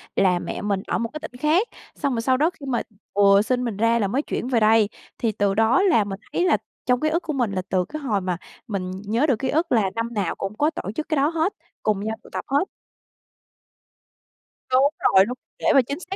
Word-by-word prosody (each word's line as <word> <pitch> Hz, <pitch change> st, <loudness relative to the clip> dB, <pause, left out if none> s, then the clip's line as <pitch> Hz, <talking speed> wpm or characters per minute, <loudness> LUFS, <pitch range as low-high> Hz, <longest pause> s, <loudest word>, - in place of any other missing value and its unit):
là 180 Hz, -2 st, +3 dB
mẹ -, -, -5 dB
mình 200 Hz, -2 st, -1 dB
ở -, -, 0 dB
một 230 Hz, -1 st, -2 dB
cái 305 Hz, -, -5 dB
tỉnh 300 Hz, -5 st, -9 dB
khác, 335 Hz, +10 st, +3 dB, 0.3 s
xong 280 Hz, -4 st, -1 dB
rồi 230 Hz, -, -1 dB
sau 255 Hz, +2 st, +2 dB
đó 310 Hz, +4 st, +3 dB
khi 325 Hz, -6 st, -12 dB
mà 245 Hz, -3 st, 0 dB, 0.3 s
vừa 200 Hz, 0 st, +6 dB
sinh 250 Hz, +3 st, 0 dB
mình 225 Hz, -5 st, -3 dB
ra 230 Hz, +1 st, +3 dB
là 200 Hz, -, +1 dB
mới 260 Hz, +8 st, 0 dB
chuyển 250 Hz, -, -4 dB
về 245 Hz, -3 st, +2 dB
đây, 215 Hz, -1 st, +4 dB, 0.3 s
thì 225 Hz, -2 st, 0 dB
từ 200 Hz, -1 st, +1 dB
đó 225 Hz, -, +4 dB
là 340 Hz, -, +4 dB
mình 195 Hz, -1 st, -6 dB
thấy 355 Hz, -, +2 dB
là -, -, +4 dB, 0.3 s
trong 250 Hz, -1 st, +2 dB
ký 310 Hz, -, +1 dB
ức 335 Hz, +3 st, 0 dB
của 310 Hz, -, -3 dB
mình 245 Hz, -7 st, 0 dB
là 185 Hz, -, -1 dB
từ 180 Hz, -1 st, +1 dB
cái 305 Hz, 0 st, -7 dB
hồi 210 Hz, -8 st, 0 dB
mà 180 Hz, -2 st, -2 dB, 0.3 s
mình 185 Hz, -4 st, -3 dB
nhớ 230 Hz, +7 st, +1 dB
được 245 Hz, -6 st, +2 dB
ký 260 Hz, 0 st, -1 dB
ức 325 Hz, +4 st, 0 dB
là 215 Hz, -5 st, +3 dB
năm 230 Hz, +1 st, -2 dB
nào 200 Hz, -5 st, -1 dB
cũng 195 Hz, +2 st, -5 dB
có 300 Hz, -, +3 dB
tổ 325 Hz, -, -5 dB
chức 305 Hz, +9 st, -5 dB
cái 310 Hz, -, +1 dB
đó 280 Hz, +1 st, +3 dB
hết, 335 Hz, +4 st, 0 dB, 0.3 s
cùng 210 Hz, -2 st, +1 dB
nhau 220 Hz, 0 st, -2 dB
tụ -, -, -15 dB
tập -, -, -4 dB
hết. 285 Hz, +7 st, +2 dB, 2.1 s
Đúng 265 Hz, +2 st, +5 dB
rồi, 190 Hz, 0 st, +5 dB
đúng, 250 Hz, +4 st, -5 dB, 0.2 s
để -, -, -6 dB
mà 270 Hz, -, +7 dB
chính 280 Hz, +4 st, -3 dB
xác 375 Hz, +1 st, -6 dB
235 Hz, 250 wpm, -23 LUFS, 205-290 Hz, 2.1 s, mà